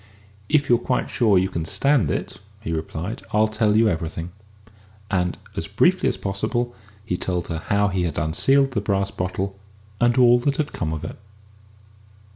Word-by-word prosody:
"If 145 -2 +3
you're 120 -1 +4
quite 125 +1 -1
sure 110 -6 +3
you 95 +1 +3
can 85 -3 -3
stand 130 - +2
it," - - -3 0.2
he 80 - -5
replied, 80 +5 -4
"I'll 110 +1 +4
tell 110 -1 +2
you 115 0 +5
everything." 85 -1 -3 0.8
And, 90 -2 0 0.2
as - - -3
briefly - - +3
as - - -3
possible, 120 +5 -2 0.3
he 90 -5 -1
told 90 -2 -3
her 80 -1 -2
how 100 0 +2
he 95 -1 -1
had 85 -2 -2
unsealed 135 - +3
the 110 -6 -1
brass 100 -1 0
bottle, 95 +2 -3 0.4
and 120 +1 +3
all 120 -1 +6
that 140 +3 0
had 150 -2 -2
come 80 -2 -2
of 80 -1 -4
it. - - -7
100 Hz, 175 wpm, -23 LUFS, 90-120 Hz, 0.8 s, all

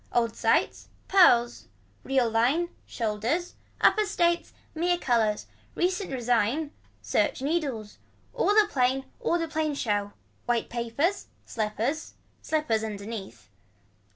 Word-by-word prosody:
Old 230 -2 +1
sight. - - +1 0.2
Pearls. 240 -11 +4 0.4
Real 265 -3 +2
line. 250 +10 +2 0.2
Shoulders. 230 +10 -2 0.3
Upper 430 -1 +4
states. 345 -3 +1 0.2
Mere 350 +2 +1
colors. 225 -8 +1 0.3
Recent 365 +1 -1
resign. 245 +4 0 0.3
Search - - +1
needles. 270 -8 -2 0.3
All - - +1
a 420 - +4
plain 265 -5 +1
all 345 - +1
a 330 - -2
plain 310 -2 -1
show. 205 -5 -1 0.3
White 240 -1 0
papers. 240 - -1 0.2
Slippers. 225 +7 -3 0.3
Slippers 300 -9 0
underneath. 205 - -7
255 Hz, 110 wpm, -27 LUFS, 225-330 Hz, 0.4 s, Pearls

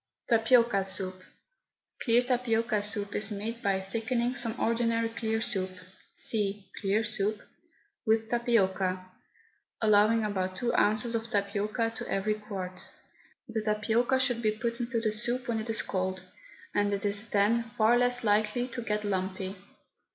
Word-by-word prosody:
TAPIOCA 230 -2 +4
SOUP. 190 -1 +1 0.8
Clear 240 0 +3
tapioca 230 -4 +1
soup 205 -1 -1
is 210 +1 0
made 220 +3 -4
by 195 -1 +1
thickening 230 +5 -1
some 235 -2 -1
ordinary 230 0 +1
clear 225 -1 -2
soup 190 -5 -1 0.4
(see 205 - -2
CLEAR 205 +2 +1
SOUP) 215 -1 -1 0.7
with 220 0 +2
tapioca, 190 -6 0 0.7
allowing 215 +1 +4
about 185 -3 -2
two 240 +3 -1
ounces 215 +3 +2
of 230 0 -2
tapioca 210 +3 -1
to - - -6
every 205 +2 +1
quart. 200 -4 -6 0.6
The 225 -2 -2
tapioca 220 +4 +1
should 245 -3 +3
be 215 - +2
put 230 +2 -2
into 240 -1 -1
the 220 -1 0
soup 240 +4 -1
when 230 -2 0
it 220 +1 -5
is 225 - +1
cold, 185 -1 -2 0.5
and 205 0 +1
it 200 +1 -2
is 205 +2 -2
then 225 +3 +2
far 220 +2 +5
less 245 0 +2
likely 215 +3 +2
to 240 0 -5
get 210 -2 -2
lumpy. 190 -1 -2
220 Hz, 145 wpm, -29 LUFS, 200-230 Hz, 0.8 s, far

